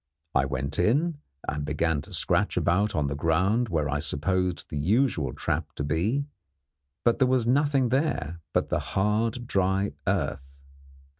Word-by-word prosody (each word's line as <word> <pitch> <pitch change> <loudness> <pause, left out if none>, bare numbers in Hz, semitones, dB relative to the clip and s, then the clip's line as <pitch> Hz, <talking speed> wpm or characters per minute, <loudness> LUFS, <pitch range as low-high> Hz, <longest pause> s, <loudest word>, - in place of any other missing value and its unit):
I 65 - +3
went 70 +1 -3
in, 145 - +2 0.3
and 75 -1 -2
began 75 +1 0
to - - -11
scratch - - +1
about 100 +5 +2
on 75 - +1
the 70 - -1
ground 95 +10 +1
where 80 -4 0
I 75 0 -1
supposed 90 +4 -1
the 75 - -3
usual 90 - +1
trap 80 +4 -2
to - - -3
be; 95 - 0 0.8
but 120 - +3
there 130 - +4
was 125 -2 +2
nothing 135 0 +2
there 115 - -1
but - - 0
the - - +1
hard, 110 +4 0
dry 95 -1 +1 0.2
earth. 70 -7 -2
90 Hz, 155 wpm, -27 LUFS, 75-120 Hz, 0.8 s, there